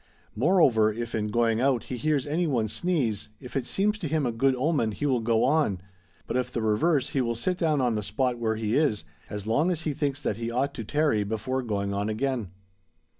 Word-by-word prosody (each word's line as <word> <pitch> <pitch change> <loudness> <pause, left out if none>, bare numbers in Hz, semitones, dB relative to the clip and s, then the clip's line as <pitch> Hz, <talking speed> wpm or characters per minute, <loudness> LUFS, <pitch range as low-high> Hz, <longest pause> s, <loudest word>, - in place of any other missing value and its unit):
Moreover, 125 - +4
if 115 +2 -5
in 105 -1 -1
going 115 +1 +1
out, 130 -3 +2
he 130 - -5
hears 145 +1 0
any 165 +4 0
one 120 -7 +1
sneeze, 120 - -1
if 125 - -11
it 130 -3 -1
seems 210 +2 0
to 175 - -3
him 155 -1 0
a 120 - 0
good 130 +3 +2
omen 130 -5 +1
he 145 - -3
will 130 -4 +2
go 115 0 +2
on, 135 - +2 0.5
but - - -4
if 125 -1 -1
the 120 - -2
reverse 130 +6 +2
he 135 - 0
will 120 -1 -1
sit 180 +11 0
down 155 -5 +2
on 120 -2 +2
the 105 - -1
spot 125 +3 -1
where 110 -1 0
he 110 0 -1
is, 140 - +2 0.3
as 105 -1 -5
long 145 +11 +2
as 170 -3 0
he 155 -2 -2
thinks 140 -1 -1
that 105 -7 -2
he 115 0 -3
ought 135 +4 -1
to 115 - -5
tarry 145 -3 +1
before 110 +5 -2
going 100 -4 -2
on 100 +2 -1
again. 120 -2 -1
125 Hz, 225 wpm, -27 LUFS, 110-145 Hz, 0.5 s, Moreover